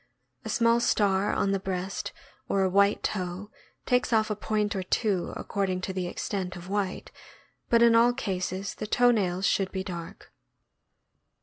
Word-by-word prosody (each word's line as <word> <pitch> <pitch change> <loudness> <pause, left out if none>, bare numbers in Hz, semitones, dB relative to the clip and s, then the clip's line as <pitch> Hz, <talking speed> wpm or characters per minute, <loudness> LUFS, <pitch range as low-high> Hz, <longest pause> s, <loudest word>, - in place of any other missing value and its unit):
A - - -6
small 230 0 +3
star 200 -4 +2
on 195 - +1
the 195 - +1
breast 190 0 -4 0.4
or 195 - +2
a 190 - +2
white 200 +2 +3
toe 185 +1 -3 0.3
takes 250 0 +1
off 220 -1 +2
a - - 0
point 210 0 -1
or 190 - -1
two, 185 0 0
according 195 -2 -2
to 190 0 -3
the 185 -1 -2
extent 185 0 -4
of 175 0 -9
white, 200 -2 -2 0.6
but 235 0 +5
in 235 -1 +6
all 230 +1 +6
cases 190 -3 -3
the 215 - -6
toe 245 +3 +4
nails 190 -4 0
should 195 -2 +1
be 190 -1 -3
dark. 170 -3 -8
195 Hz, 170 wpm, -27 LUFS, 185-215 Hz, 0.6 s, in